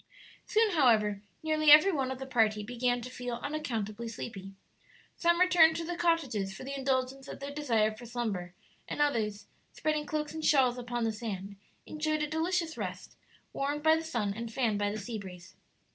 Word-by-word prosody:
Soon, 440 -1 +3
however, 220 - +3 0.2
nearly 310 -1 +2
every 305 +7 +9
one 270 -6 -1
of 260 - -4
the 265 - -6
party 220 -5 +2
began 245 +2 -1
to 245 - -7
feel 245 -1 -4
unaccountably 235 -7 -3
sleepy. 195 -4 -7 0.6
Some 345 0 +2
returned 350 -3 +6
to 335 - -3
the 350 +1 -3
cottages 275 - 0
for - - -8
the 275 +1 -5
indulgence 265 0 -1
of - - -8
their 280 +1 -6
desire 230 -7 +1
for 240 +2 -11
slumber, 205 -7 -3 0.3
and - - -5
others, 225 -8 0 0.3
spreading 305 -1 -1
cloaks 300 0 -2
and 315 0 -5
shawls 255 -5 +3
upon 240 -1 -3
the 225 - +1
sand, 200 -3 -5 0.3
enjoyed 310 0 -1
a - - -1
delicious 325 -1 -1
rest, 185 -2 -6 0.4
warmed 290 +2 -2
by 315 0 +6
the 320 - -2
sun 230 -11 -2
and 230 +2 -6
fanned 225 -4 0
by 205 0 +1
the 210 - -4
sea 220 +1 -5
breeze. 185 -1 -11
255 Hz, 185 wpm, -30 LUFS, 215-305 Hz, 0.6 s, every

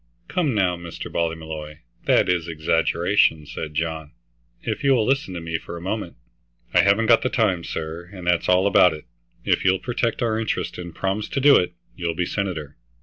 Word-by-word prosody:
"Come 160 - 0
now, 95 -3 +2
Mr. 85 -1 -8
Ballymolloy, 80 -2 -3 0.3
that - - +4
is 90 -2 0
exaggeration," 80 +1 +2
said 75 +1 -6
John. 80 -1 -3 0.5
"If - - -3
you 135 -1 +5
will 110 -3 +2
listen 135 -8 0
to - - -3
me 80 0 -3
for 85 - -8
a - - -7
moment" 95 +1 -4 0.6
"I - - +6
haven't 100 +3 +3
got 115 0 +5
the 130 - 0
time, 105 -10 +1
sir, 80 +2 -5
and 95 -3 -9
that's 90 -1 +1
all 90 +1 +4
about 90 -4 +5
it. 75 - -12 0.4
If - - +2
you'll 95 0 +4
protect 120 +1 -1
our 110 -1 +1
interests 110 -4 -2
and 85 -2 -8
promise 95 +2 -2
to - - -1
do 140 +1 +7
it, 90 0 +2 0.2
you'll 85 -2 -2
be 90 +1 0
senator. 85 -8 -4
90 Hz, 195 wpm, -23 LUFS, 80-105 Hz, 0.6 s, do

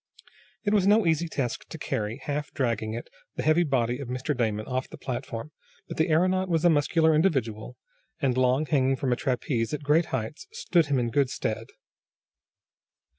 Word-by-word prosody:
It 205 -1 +1
was 200 -2 +3
no 210 0 +5
easy 165 0 +2
task 130 -7 -3
to - - -7
carry, 105 +3 -3
half 145 0 -3
dragging 115 -4 -1
it, 115 - -6 0.3
the - - -3
heavy 155 +2 +4
body 125 -6 0
of 140 - -6
Mr. 130 +5 -2
Damon 110 -3 -1
off 130 0 -3
the - - -10
platform, 120 +1 -5 0.4
but - - -7
the 160 +2 +2
aeronaut 185 +4 +2
was 165 0 +1
a 175 - +7
muscular 160 +2 +3
individual, 130 - 0 0.4
and 135 -5 +1
long 130 +3 +2
hanging 135 -3 +2
from 130 -1 0
a - - +1
trapeze, 125 -1 -1
at 150 - -8
great 155 +4 +3
heights, 130 - -4
stood 180 - +1
him 140 -2 +1
in 120 -2 0
good 140 -1 +2
stead. - - -3
140 Hz, 180 wpm, -27 LUFS, 125-160 Hz, 0.4 s, a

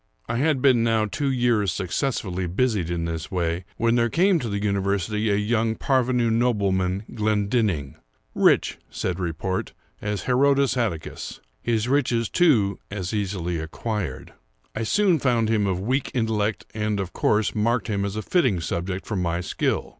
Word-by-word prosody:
I 120 - -1
had 140 -1 +1
been 125 -4 +5
now 115 -2 +2
two 140 +7 -2
years 120 -7 +2
successfully 95 -2 -2
busied 100 -2 0
in 85 -1 -2
this 80 -1 -4
way, 85 -1 -1
when 115 0 +2
there 120 0 +2
came 180 - +3
to 120 - -4
the 100 - -1
university 100 +1 0
a 100 - +3
young 110 +2 +1
parvenu 125 -3 +1
nobleman, 100 -5 +1
Glendinning—rich, 100 - 0
said 90 -1 -3
report, 90 +2 -3 0.3
as 105 -1 -2
Herodes 135 +2 +3
Atticus—his 110 - -3
riches, 120 -5 +1
too, 115 - +3
as 95 -1 -4
easily 90 -5 -2
acquired. 85 - -4 0.4
I 110 - -2
soon 185 - +3
found 120 -4 +2
him 105 -3 +2
of 90 -2 0
weak 130 +7 -1
intellect, 110 -3 0
and, 105 -1 -1
of 95 -2 -4
course, 105 0 +1
marked 115 +3 +1
him 100 -3 -1
as 100 0 -3
a 110 - -3
fitting 130 - +2
subject 90 +3 -3
for 105 - -3
my 85 -2 0
skill. 90 - -1
105 Hz, 155 wpm, -24 LUFS, 95-120 Hz, 0.4 s, been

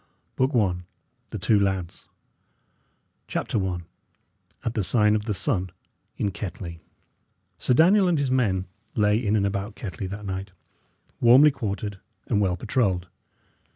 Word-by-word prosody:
BOOK 130 +1 +1
I 95 -6 +2 0.5
THE - - -5
TWO 105 -2 +3
LADS 95 -3 -2 1.2
CHAPTER 105 - -1
I 90 -2 -2 0.8
AT 115 - -1
THE 105 - 0
SIGN 105 +2 +3
OF 105 -1 -2
THE 105 -3 -1
SUN 95 -5 -1 0.5
IN 100 - 0
KETTLEY 90 -3 -6 0.8
Sir 125 - +2
Daniel 185 +6 +5
and 175 -2 +2
his 140 -3 0
men 100 -8 +1 0.3
lay 105 +2 +3
in 105 -1 +2
and 100 -2 +2
about 100 +2 -2
Kettley 100 -2 -5
that 100 +2 -7
night, 95 0 -5 0.7
warmly 130 +6 +7
quartered 105 -4 -4 0.3
and 105 -3 +1
well 90 -3 +1
patrolled. 95 -6 0
105 Hz, 140 wpm, -25 LUFS, 95-120 Hz, 1.2 s, warmly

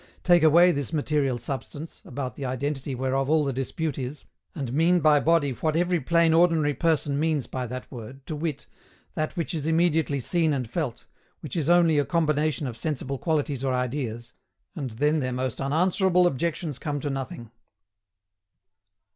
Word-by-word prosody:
Take 175 -2 +5
away 170 +3 +6
this 140 -3 -3
material 145 -4 0
substance, 140 +5 -7
about 130 -1 -5
the 140 - -7
identity 135 +1 -3
whereof 130 +2 -1
all 155 -1 +3
the 135 - -1
dispute 140 +4 -3
is, 130 +3 -6 0.3
and 135 -5 -4
mean 170 +4 +3
by 155 -2 +5
body 160 -2 +2
what 155 +5 -1
every 175 +1 +2
plain 165 +4 +3
ordinary 165 -3 +3
person 145 -1 0
means 155 -4 0
by 125 +1 -4
that 125 +2 -7
word, 130 +2 -9
to 155 - -4
wit, 150 -2 -3 0.5
that 155 +2 -3
which 165 -3 -2
is 155 -2 -2
immediately 160 -3 +2
seen 160 +4 +1
and 130 -4 -2
felt, 125 -1 -4 0.4
which 150 - -7
is 160 -2 0
only 170 -3 +5
a - - +3
combination 155 -3 0
of 120 -3 -5
sensible 135 -1 -3
qualities 145 -5 -1
or 130 -1 +1
ideas, 120 -2 -3 0.4
and 140 -6 -4
then 150 +6 +1
their 130 -2 -2
most 130 0 -3
unanswerable 180 +5 +3
objections 160 -1 -1
come 145 -2 -3
to 145 0 -3
nothing. 135 -3 -6
145 Hz, 170 wpm, -26 LUFS, 130-160 Hz, 0.5 s, away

